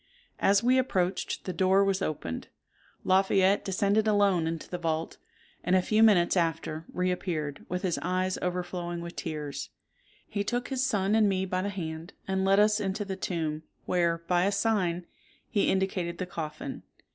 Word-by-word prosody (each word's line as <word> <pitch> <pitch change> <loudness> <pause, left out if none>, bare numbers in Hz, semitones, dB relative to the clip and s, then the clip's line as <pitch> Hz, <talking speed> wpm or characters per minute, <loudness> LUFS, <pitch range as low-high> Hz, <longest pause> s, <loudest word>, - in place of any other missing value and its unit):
As 200 +2 +4
we 255 +2 +4
approached, 185 -7 -1
the 185 - -3
door 190 +3 +4
was 195 -1 +1
opened. 85 - -3 0.6
Lafayette 190 +1 +3
descended 200 +2 +1
alone 200 -5 +3
into 165 -1 -4
the 180 - -5
vault, 160 -1 -2 0.5
and 180 +2 +2
a 185 - +5
few 215 +3 +2
minutes 195 -6 +5
after 165 -2 -1
re 180 0 0
appeared, 155 -6 -3
with 180 +1 -3
his 180 -3 0
eyes 185 +1 0
overflowing 175 -1 -3
with 170 0 -7
tears. 150 -3 -5 0.6
He 200 -1 -2
took 245 +3 -2
his 260 -2 0
son 205 -6 +1
and 215 -2 +4
me 190 -1 0
by 185 0 -1
the 200 - -2
hand, 165 -3 -6
and 190 0 0
led 195 +1 +4
us 210 +1 +4
into 200 +1 -2
the 195 -1 -4
tomb, 160 -5 -2 0.2
where, 170 -2 +1
by 180 +1 +2
a 200 - +2
sign, 195 -5 0 0.5
he 205 -3 +2
indicated 190 -3 0
the 185 - -3
coffin. 160 -4 -6
185 Hz, 170 wpm, -28 LUFS, 170-200 Hz, 0.6 s, a